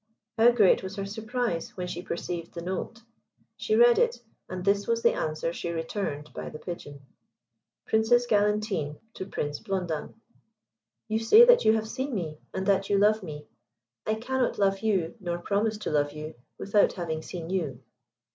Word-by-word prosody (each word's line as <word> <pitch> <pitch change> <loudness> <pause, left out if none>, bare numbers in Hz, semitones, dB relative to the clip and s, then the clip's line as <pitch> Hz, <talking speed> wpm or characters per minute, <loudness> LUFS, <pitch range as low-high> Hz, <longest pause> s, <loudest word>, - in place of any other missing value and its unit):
How 230 +1 +6
great 220 -6 +4
was 190 +1 -6
her 195 -1 -3
surprise 220 -3 -3
when 180 - -3
she 175 -1 -5
perceived 170 -1 -5
the 170 - -5
note! 190 +6 -4 0.5
She 435 - 0
read 480 0 +6
it, 480 0 +2 0.3
and 185 0 -5
this 200 0 +2
was 230 0 0
the - - +5
answer 155 +2 -2
she 170 - -4
returned 165 -3 -4
by - - -6
the - - -8
Pigeon: 145 -5 -8 0.8
"Princess 225 +2 +3
Galantine 210 -8 +1 0.2
to 190 - -6
Prince 145 -6 -3
Blondin. 180 -6 -3 0.9
"You 220 0 0
say 430 - +8
that - - +6
you 220 - +6
have 220 0 -1
seen 260 +3 -3
me, 155 -5 -4
and 190 0 -3
that 195 0 +2
you 200 - +3
love 210 +2 +4
me. 150 -5 -8 0.6
I 215 - +2
cannot 250 +2 -1
love 195 -1 +2
you, 195 -7 0
nor 175 -3 -3
promise 210 +4 0
to 210 - -4
love 145 -1 +1
you, 155 +1 -7 0.2
without 200 +1 +2
having 160 -3 -3
seen 170 0 -7
you. 145 -9 -2
195 Hz, 175 wpm, -27 LUFS, 170-220 Hz, 0.9 s, say